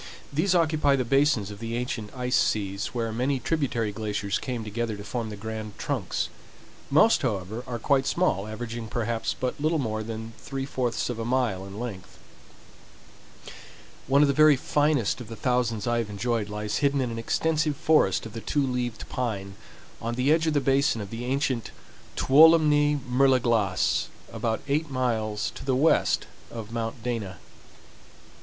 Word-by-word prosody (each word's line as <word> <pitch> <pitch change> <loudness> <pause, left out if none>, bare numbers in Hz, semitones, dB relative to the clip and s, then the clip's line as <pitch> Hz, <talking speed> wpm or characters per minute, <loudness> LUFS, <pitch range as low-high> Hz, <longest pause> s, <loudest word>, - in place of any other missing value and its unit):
These 180 +6 +2
occupy 155 -4 +3
the 130 -2 -1
basins 135 -5 +2
of 100 - -9
the 115 +1 -4
ancient 120 -3 -3
ice 125 0 0
seas, 100 -1 0
where 115 -2 -3
many 130 +4 0
tributary 125 -5 -1
glaciers 105 -1 -2
came 125 -3 -4
together 110 0 -3
to 100 - -8
form 115 0 -4
the 105 - -6
grand 110 0 -6
trunks. - - -2 0.6
Most, 155 +11 +5
however, 110 -1 -2
are 120 -1 -3
quite 135 +3 +1
small, 105 - +1
averaging 115 +1 -5
perhaps 115 0 -2
but 130 +2 -2
little 160 +2 +2
more 110 -6 -2
than 110 0 -6
three 135 -1 -4
fourths 125 -3 -1
of 115 - -6
a - - -2
mile 115 -6 0
in 100 +2 -8
length. 105 -7 -7 1.9
One 140 +3 +5
of - - +4
the 140 - +2
very 155 0 +6
finest 145 -3 +1
of 120 - -8
the 115 - -7
thousands 120 -3 0
I 120 0 +1
have 115 -2 -3
enjoyed 105 +1 -1
lies 105 0 -3
hidden 140 -1 +2
in 125 -3 -1
an 115 - -4
extensive 155 +4 0
forest 155 - +3
of 110 - -8
the 115 - -6
Two 145 +3 0
leaved 125 -3 -3
Pine, 100 -6 -3 0.5
on 115 +1 -2
the 130 +4 +2
edge 160 +1 +3
of 155 - +1
the - - +5
basin 135 -3 +2
of 100 -2 -6
the 115 +1 -5
ancient 130 -2 -1 0.5
Tuolumne 150 0 +5
Mer 130 +2 +4
de 130 -1 +4
Glace, 110 -7 +1 0.3
about 110 -1 -1
eight 150 +2 0
miles 110 -5 -1
to - - -9
the 135 -1 +1
west 150 +5 +3 0.2
of 110 -2 -8
Mount 115 0 -4
Dana. 110 -7 -3
120 Hz, 175 wpm, -26 LUFS, 110-140 Hz, 1.9 s, very